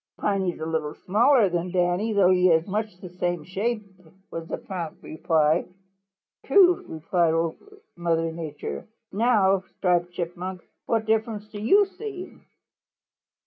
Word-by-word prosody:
"Piney 195 -3 0
is - - -14
a 155 - -4
little 160 -2 -2
smaller 230 +4 +4
than 175 0 -2
Danny, 180 +4 +1
though 195 -3 +4
he 185 0 +4
is 160 -1 +3
much 210 -1 -3
the 185 - -9
same 175 -3 -1
shape," 210 +5 -2 0.5
was 165 0 -6
the - - -3
prompt 175 -5 -7
reply. 155 -1 +1 0.8
"True," 360 - +3
said 170 -4 +3
Old 165 0 0 0.4
Mother 165 -1 0
Nature. 160 -3 -6 0.2
"Now, 200 -3 +3 0.2
Striped 175 -2 +1
Chipmunk, 175 +1 -5 0.2
what 225 -1 +1
difference 220 -1 -1
do 210 -1 -8
you 400 - +5
see?" 390 -2 -8
185 Hz, 140 wpm, -25 LUFS, 170-215 Hz, 0.8 s, you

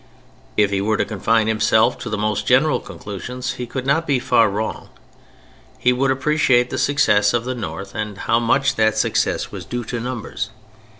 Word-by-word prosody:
If 105 -1 +3
he 100 -1 0
were 105 +1 +1
to - - +1
confine 110 +1 +1
himself 110 +2 +2
to 120 - -6
the 105 - -2
most 105 0 -1
general 135 +5 +4
conclusions 125 +6 -6
he 125 - -6
could 130 +2 -5
not 160 +4 +1
be 140 -2 +2
far 120 -2 +3
wrong. 105 +2 -4 0.9
He 125 - +2
would 135 +2 +1
appreciate 130 -2 +2
the - - -2
success 105 -7 +3
of 120 0 -1
the 130 - -2
North 100 -4 -6
and 105 -2 -4
how 115 +3 +1
much 135 +4 +1
that 110 0 +2
success - - 0
was - - -7
due 120 0 -4
to 120 +1 -4
numbers. 120 -3 -4
115 Hz, 185 wpm, -20 LUFS, 105-130 Hz, 0.9 s, general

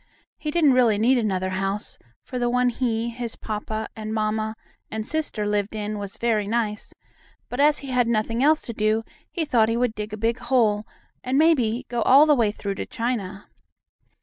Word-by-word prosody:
He 305 - -3
didn't 300 -3 +4
really 240 -5 +4
need 245 +4 +3
another 190 -4 -1
house, 195 +2 -3 0.2
for 250 - -5
the 240 0 +1
one 250 0 +2
he, 230 -2 -1
and 235 0 -4
his 235 -2 -4
papa, 215 0 -4
and 220 0 -5
mamma, 215 0 -1 0.3
and 220 0 -4
sister, 300 -9 -2
lived 205 0 -1
in 210 0 -3
was 200 -1 -6
very 220 -3 0
nice, 215 -1 -2 0.6
but, 245 - -5
as 295 +1 +5
he - - -7
had 250 -2 +2
nothing 230 +1 0
else 305 +3 +4
to 235 - -5
do, 215 +1 +1 0.3
he 335 -3 -2
thought 230 -6 +3
he 230 - 0
would 245 -2 +1
dig 210 -1 -5
a 215 - -5
big 230 +3 0
hole, 235 -4 +1 0.4
and, 255 +2 0
maybe, 260 -7 +3
go 240 -1 -2
all 275 +6 +7
the 305 - +5
way 235 -6 +3
through 200 -1 -4
to - - -5
China. 220 -5 -3
225 Hz, 200 wpm, -24 LUFS, 215-250 Hz, 0.6 s, all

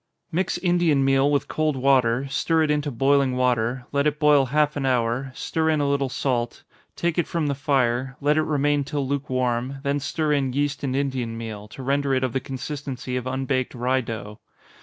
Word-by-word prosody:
_ - - -54 0.3
Mix 180 +2 0
Indian 175 -6 +2
meal 135 +1 +3
with 145 -1 +1
cold 155 -2 0
water, 130 -1 +2
stir 160 +4 +1
it 150 - +1
into 150 0 0
boiling 135 0 +2
water, 125 0 0
let 140 +1 +2
it 150 0 0
boil 150 -3 +4
half 150 +2 +1
an 145 - -2
hour 125 0 0
stir 160 0 -1
in 155 -1 +2
a 145 - +1
little 140 -1 +1
salt, 120 -3 -2 0.3
take 170 0 0
it 170 - 0
from 170 -4 -1
the 145 - 0
fire, 130 -2 0
let 150 +1 +2
it 155 - +3
remain 145 -1 +1
till 140 -1 -3
lukewarm, 130 -2 -1
then 140 0 0
stir 150 +2 -1
in 135 -3 0
yeast 145 +1 -1
and 130 -2 -1
Indian 130 -5 -2
meal, 110 -2 -7
to 130 +5 -10
render 140 0 +1
it 130 - 0
of 130 -2 -1
the 135 - +1
consistency 135 -1 -5
of 125 0 -3
unbaked 130 0 -1
rye 125 +2 +1
dough. 110 -3 -7
135 Hz, 200 wpm, -24 LUFS, 125-145 Hz, 0.3 s, boil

